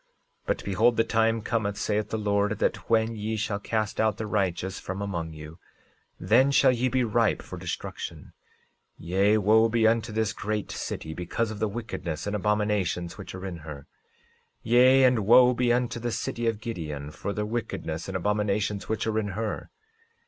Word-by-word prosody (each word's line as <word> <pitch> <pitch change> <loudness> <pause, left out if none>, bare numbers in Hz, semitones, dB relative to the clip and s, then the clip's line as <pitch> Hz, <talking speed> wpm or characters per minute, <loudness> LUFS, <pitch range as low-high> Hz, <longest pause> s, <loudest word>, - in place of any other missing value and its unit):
But - - -1
behold, 110 +5 +3
the 115 - +4
time 115 0 +1
cometh, 105 -4 -1
saith 105 0 -1
the 110 - -2
Lord, 105 0 0
that - - -1
when 115 0 +2
ye 110 +1 -3
shall 105 -1 -2
cast 110 0 -1
out 110 -1 +1
the 110 - -3
righteous 95 -3 -1
from 95 +1 -5
among 85 -5 -3
you, 75 +2 -10 0.6
then 130 +5 +4
shall 140 -1 +5
ye 125 +1 0
be 130 0 +1
ripe 115 -2 +1
for - - -8
destruction; - - -6 0.6
yea, 100 +5 +2
wo 110 +2 +4
be 115 0 +2
unto 115 0 +2
this 110 0 0
great 105 -1 -3
city, 80 - -5
because 100 +7 -2
of 105 - -7
the 110 - +1
wickedness 100 -8 -5
and 100 0 -2
abominations 105 -4 0
which 95 - -8
are 95 +1 -7
in 90 -3 -5
her. 75 -3 -8
13:15 - - -21 0.8
Yea, 130 +3 +6
and 125 -2 +5
wo 125 +2 +7
be 120 0 +1
unto 120 -1 0
the 120 +1 -2
city 120 +1 -2
of 115 -2 0
Gideon, 75 -10 -5
for 100 - -4
the 105 +1 -2
wickedness 105 -7 -4
and 95 -1 -2
abominations 105 +1 -1
which 110 - -1
are 110 0 0
in 105 - -2
her. 110 -1 -3
105 Hz, 185 wpm, -27 LUFS, 100-115 Hz, 0.8 s, wo